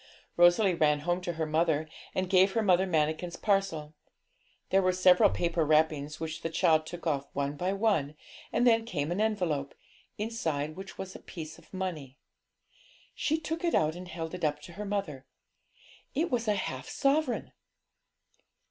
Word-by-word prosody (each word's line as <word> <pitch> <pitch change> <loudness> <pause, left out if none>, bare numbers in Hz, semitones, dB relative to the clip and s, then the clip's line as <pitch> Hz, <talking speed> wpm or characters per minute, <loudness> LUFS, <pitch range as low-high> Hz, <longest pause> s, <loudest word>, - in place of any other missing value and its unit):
Rosalie 175 +3 +5
ran 150 -3 +2
home 175 +3 0
to 175 -1 -3
her 160 -1 -2
mother 155 0 +1 0.3
and 185 0 0
gave 190 +1 +4
her 225 - +1
Mother 190 -1 +3
Manikin's 160 +1 0
parcel. 195 -7 0 0.8
There 195 - +5
were 185 -1 +2
several 180 0 +6
paper 170 -1 0
wrappings, 150 -1 +1
which 160 0 -5
the 165 - -2
child 160 -1 +2
took 175 +1 -8
off 140 -3 0
one 140 +1 -2
by 180 +5 -1
one, 195 -9 +1 0.4
and 240 - +2
then 225 -2 +5
came 165 -9 -3
an 185 +4 0
envelope, 180 -10 -1 0.4
inside 160 -9 -2
which 190 +1 -9
was 190 -1 -7
a - - -8
piece 160 -2 -9
of - - -22
money. 165 -8 -5 1.0
She 315 +1 0
took 325 +2 -4
it 340 - +2
out 155 +1 +2
and 180 +1 -8
held 165 -1 -6
it 180 - -6
up 150 -1 +1
to 170 - -11
her 210 +3 -6
mother; 155 -10 -3 0.9
it 325 +3 0
was 240 -2 0
a 210 - +3
half 130 -9 -4
sovereign! 275 -2 0
175 Hz, 170 wpm, -29 LUFS, 155-195 Hz, 1.0 s, several